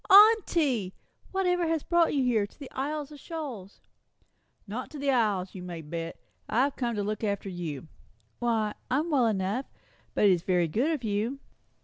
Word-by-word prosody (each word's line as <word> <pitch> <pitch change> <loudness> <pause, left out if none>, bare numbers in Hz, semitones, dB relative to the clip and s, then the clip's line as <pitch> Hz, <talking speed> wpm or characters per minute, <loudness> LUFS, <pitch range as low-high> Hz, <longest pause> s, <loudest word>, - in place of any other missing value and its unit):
"Aunty! 335 - +6 0.4
Whatever 360 -2 +1
has 320 -2 0
brought 345 -1 +3
you 275 -3 +2
here, 225 -5 +2
to - - -25
the 275 - -9
Isles 295 +2 -3
of 295 - -10
Shoals?" 270 - -7 0.8
"Not 225 +5 -5
to 305 - -9
see - - -7
the 280 -1 +2
Isles, 205 -7 +1
you 185 - -7
may 175 -2 -6
bet. 165 +2 -5 0.3
I've 260 +6 +2
come 240 -3 -1
to 205 - -1
look 215 +2 -3
after 200 -2 -1
you." 165 -6 -5 0.5
"Why, 220 -3 +1 0.2
I'm 305 +6 +1
well 260 -5 +4
enough. 210 +5 -1 0.5
But - - +4
it's 185 -4 +5
very 180 -1 +2
good 235 - +1
of 310 -6 -1
you." 220 +5 -1
235 Hz, 175 wpm, -28 LUFS, 195-295 Hz, 0.8 s, Aunty